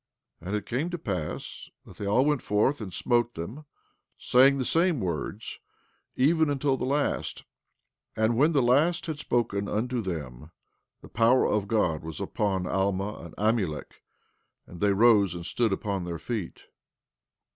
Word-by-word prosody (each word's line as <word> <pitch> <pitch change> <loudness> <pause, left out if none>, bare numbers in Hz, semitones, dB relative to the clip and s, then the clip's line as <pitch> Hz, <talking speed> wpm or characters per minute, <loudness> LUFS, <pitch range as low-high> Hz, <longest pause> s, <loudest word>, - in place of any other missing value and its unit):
14:25 85 - -10
And 100 - -1
it 100 - -6
came 135 +10 -2
to 175 - -4
pass 90 - -5 0.2
that - - -14
they 100 - -4
all 120 +7 +3
went 150 -4 +1
forth 110 +7 +1
and 100 -3 -6
smote 120 +6 0
them, 115 - -7 0.5
saying 135 +2 +4
the 130 - -1
same 165 0 +2
words, 85 -6 -4 0.6
even 160 +4 +3
until 140 -1 +1
the 130 - -3
last; 145 +2 -1 0.7
and 110 +1 +2
when 150 +7 +4
the 140 -5 +2
last 150 +9 +3
had 160 -4 -4
spoken 115 -7 -1
unto 120 +3 -1
them 75 - -6 0.5
the - - -10
power 120 +3 +3
of 105 -1 0
God 90 -8 +1
was 80 -1 -7
upon 95 -3 -1
Alma 95 +2 -1
and 85 - -11
Amulek, 105 -8 -1 0.6
and 85 - -12
they 100 -1 +3
rose 100 -3 +4
and 85 -1 -7
stood 115 +2 0
upon 95 -1 -2
their 85 -1 -4
feet. 105 +1 -5
110 Hz, 160 wpm, -27 LUFS, 95-130 Hz, 0.7 s, saying